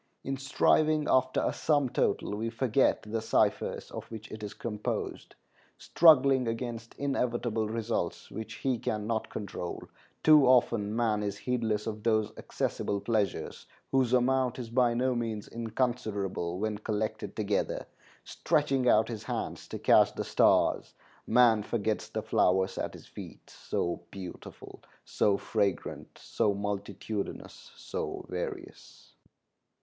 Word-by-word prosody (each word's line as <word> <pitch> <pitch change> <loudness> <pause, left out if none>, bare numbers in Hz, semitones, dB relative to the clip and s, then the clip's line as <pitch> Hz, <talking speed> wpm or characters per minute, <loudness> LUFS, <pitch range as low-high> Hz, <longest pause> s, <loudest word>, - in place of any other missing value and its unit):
In 135 - -2
striving 150 +3 +2
after 130 0 +2
a - - 0
sum 145 -3 +2
total, 105 - 0
we 115 +2 -2
forget 120 +2 +2
the 110 +1 -3
ciphers - - 0
of - - -6
which 110 -1 -9
it 110 - -7
is 105 -1 -6
composed; 105 -3 -4 0.4
struggling 135 -6 +5
against 115 0 -4
inevitable 120 -5 -1
results 115 -5 -3
which 110 - -6
he 130 -3 -1
can 105 -1 -2
not 110 0 -2
control, 95 -4 -5 0.4
too 155 -3 +7
often 115 -4 +3
man 110 -3 +1
is 100 -1 -3
heedless 110 -3 -1
of 110 -1 -4
those 110 -1 +1
accessible 100 - -2
pleasures 110 -2 -2 0.2
whose 130 -3 +2
amount 125 0 +2
is 120 -3 -6
by 120 -1 +3
no 130 +2 +1
means 115 -3 -3
inconsiderable 110 -7 -2
when 105 +1 -2
collected 110 0 -3
together; 105 -2 -1 0.4
stretching 130 -2 +1
out 110 +1 +4
his 115 -3 -6
hands - - -4
to - - -5
catch - - +4
the - - -2
stars, - - +2 0.3
man 115 -2 +5
forgets 110 0 -2
the - - -3
flowers 95 +1 +2
at - - -3
his - - -13
feet, - - -11
so 85 0 -3
beautiful, 95 -2 -10 0.2
so 100 -1 +2
fragrant, 100 -4 -2
so 105 -3 0
multitudinous, 100 +1 -5
so - - -5
various." - - -7
115 Hz, 135 wpm, -30 LUFS, 105-125 Hz, 0.4 s, too